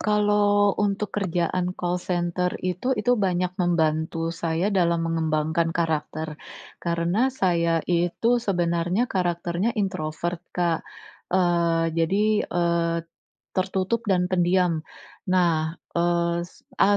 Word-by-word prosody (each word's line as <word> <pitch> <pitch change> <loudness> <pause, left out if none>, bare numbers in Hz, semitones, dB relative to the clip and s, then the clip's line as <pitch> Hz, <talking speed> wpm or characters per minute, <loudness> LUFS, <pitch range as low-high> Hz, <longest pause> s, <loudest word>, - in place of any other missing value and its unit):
kalau 205 -1 +3
untuk 205 0 -1
kerjaan 180 -1 -1
call 180 0 -1
center 180 0 -1
itu, 185 +9 -1
itu 220 +3 +2
banyak 180 -2 0
membantu 165 -1 0
saya 170 +4 -1
dalam 170 -3 +2
mengembangkan 160 0 0
karakter. 155 -1 -2 0.4
Karena 170 +8 +1
saya 170 -9 +1
itu 180 +8 +1
sebenarnya 175 +1 0
karakternya 175 +3 -1
introvert, 175 -3 -2 0.2
Kak. 170 -2 +1 0.5
Eee, 170 -2 +2
jadi, 200 +6 +2
eee, 170 -1 +1 0.6
tertutup 190 +4 0
dan 180 -2 +3
pendiam. 175 -2 +2 0.5
Nah, 170 -3 +2 0.6
es 175 - -11 0.2
ah, 205 +1 +5
175 Hz, 105 wpm, -24 LUFS, 165-190 Hz, 0.6 s, ah